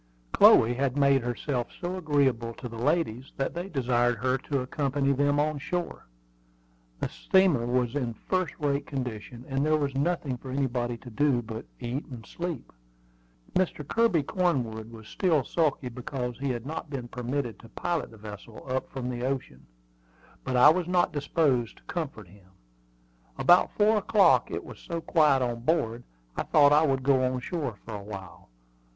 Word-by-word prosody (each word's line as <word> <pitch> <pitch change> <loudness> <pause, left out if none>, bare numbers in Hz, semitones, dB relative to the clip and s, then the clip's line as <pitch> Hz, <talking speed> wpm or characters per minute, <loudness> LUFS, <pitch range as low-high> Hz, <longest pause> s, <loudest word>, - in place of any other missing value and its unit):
Chloe 115 +2 +7
had 135 +1 -1
made 140 -1 +4
herself 120 +1 -2
so 180 +1 -3
agreeable 135 -9 +1
to 125 - -7
the 115 - -9
ladies 135 -4 0
that 135 - -1
they 175 +3 -5
desired 120 - +1
her 130 +4 +1
to 140 0 -2
accompany 140 +1 0
them 145 +1 +2
on 150 0 0
shore. 175 - -4 0.9
The - - -1
steamer 180 -11 +2
was 125 -1 +1
in 120 -5 -2
first 185 +2 -2
rate 145 -1 -1
condition, 125 -2 -5
and 135 0 -1
there 155 +1 +3
was 140 -2 -1
nothing 140 -2 -1
for 130 - -10
anybody 125 -3 -1
to 125 +1 -12
do 135 -1 +2
but 110 0 -7
eat 125 +3 -4
and 120 -5 -9
sleep. 170 -7 -6 0.8
Mr. 175 -6 0
Kirby 225 -9 +2
Cornwood 125 - -1
was 110 -2 -12
still 165 -8 +1
sulky 150 -3 0
because 125 0 -5
he 140 0 -2
had 120 -1 -3
not 160 +2 -5
been 130 -4 -5
permitted 125 0 -3
to 115 - -14
pilot 170 -6 -2
the 115 - -14
vessel 105 +1 -10
up 130 0 -2
from 130 -2 -5
the 125 -1 -4
ocean; 130 - -4 0.8
but 130 -1 -1
I 125 +4 +9
was 175 +2 +1
not 180 -1 +2
disposed 140 -5 0
to - - -20
comfort 145 - -5
him. 95 +1 -19 0.9
About 175 +1 +5
four 215 +1 +4
o'clock, 210 0 +4
it - - -4
was - - -11
so 170 -2 -4
quiet 150 -5 +3
on 120 -1 -2
board, 120 -4 0 0.3
I - - -1
thought 145 -1 +5
I 155 +1 +5
would 135 -1 0
go 135 -1 +3
on 130 0 0
shore 140 - -3
for 115 - -7
a 100 -1 -6
while. 100 - -10
135 Hz, 175 wpm, -28 LUFS, 120-155 Hz, 0.9 s, I